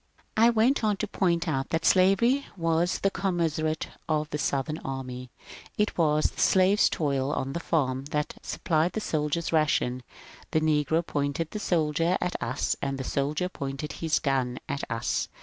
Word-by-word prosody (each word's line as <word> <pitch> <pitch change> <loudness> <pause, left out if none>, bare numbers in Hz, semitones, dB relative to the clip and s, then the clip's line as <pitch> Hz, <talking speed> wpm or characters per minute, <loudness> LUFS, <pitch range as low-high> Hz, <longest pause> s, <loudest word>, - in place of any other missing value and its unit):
I 230 +2 +6
went 235 +3 +2
on 210 -2 +2
to 215 - -2
point 175 -4 0
out 135 -4 -1
that 165 0 -1
slavery 195 +9 +4
was 165 +1 +1
the 195 - +2
commissariat 165 -5 -1 0.2
of 155 -1 0
the 150 - -2
Southern 145 +3 -1
army; 130 -2 -6 0.5
it 210 0 +1
was 155 -2 +2
the - - -5
slave's 190 +2 +4
toil 140 -3 0
on 135 -1 -2
the 170 - -2
farm 135 -6 0
that 150 0 -2
supplied 160 +1 0
the - - -1
soldier's 155 -3 -1
ration; 140 -5 +2 0.5
the 155 - +2
negro 155 +1 +1
pointed 145 +2 -2
the 210 - -4
soldier 165 -1 +1
at 180 0 -2
us 120 +3 -1
as 135 -1 -2
the 135 - -4
soldier 145 +6 -1
pointed 140 -3 -5
his 160 -2 0
gun 130 -4 0
at 140 -2 -3
us. 115 0 -1
155 Hz, 165 wpm, -27 LUFS, 140-175 Hz, 0.5 s, I